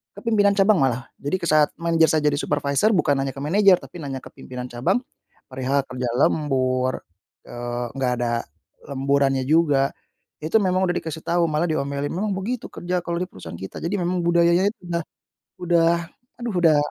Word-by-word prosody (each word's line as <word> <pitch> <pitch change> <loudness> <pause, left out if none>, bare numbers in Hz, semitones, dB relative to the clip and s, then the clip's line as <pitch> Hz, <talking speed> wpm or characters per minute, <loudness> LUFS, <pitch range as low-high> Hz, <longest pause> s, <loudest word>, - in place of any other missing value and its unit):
ke - - -9
pimpinan 210 -4 +3
cabang 200 +2 +5
malah. 130 -1 0
Jadi, 145 +7 -1
ke 170 - -3
saat 155 -1 +4
manajer 165 -1 +3
saya 150 - -1
jadi 145 - +2
supervisor, 145 +8 +1
bukan 170 -8 +2
hanya 135 - -2
ke 135 - -10
manajer, 190 +6 +4
tapi 175 - -11
nanya 135 -1 -4
ke - - -13
pimpinan 125 0 -7
cabang 120 - 0 0.5
perihal 130 +2 -1
kerja 130 -1 -3
lembur, 130 -4 +1 0.5
eee, 120 0 -4
nggak 130 -2 0
ada 120 -1 0 0.5
lemburannya 135 -1 +1
juga. 145 -3 +3 0.5
Itu 165 +8 +3
memang 185 -2 +1
udah 175 - 0
dikasih 160 0 -7
tahu, 170 0 +1
malah 155 +2 0
diomelin, 140 -1 -2
"Memang 200 +2 -1
begitu 230 +6 -3
kerja 180 +1 -3
kalau 170 0 -4
di - - +2
perusahaan 85 -3 -9
kita". 95 +3 -8
Jadi 170 +5 -2
memang 180 -1 -1
budayanya 170 +2 +4
itu 215 +2 -4
udah 170 0 -1 0.6
udah, 170 -1 +3 0.5
aduh, 235 -3 -4
udah 165 -4 +4
155 Hz, 175 wpm, -23 LUFS, 135-180 Hz, 0.6 s, cabang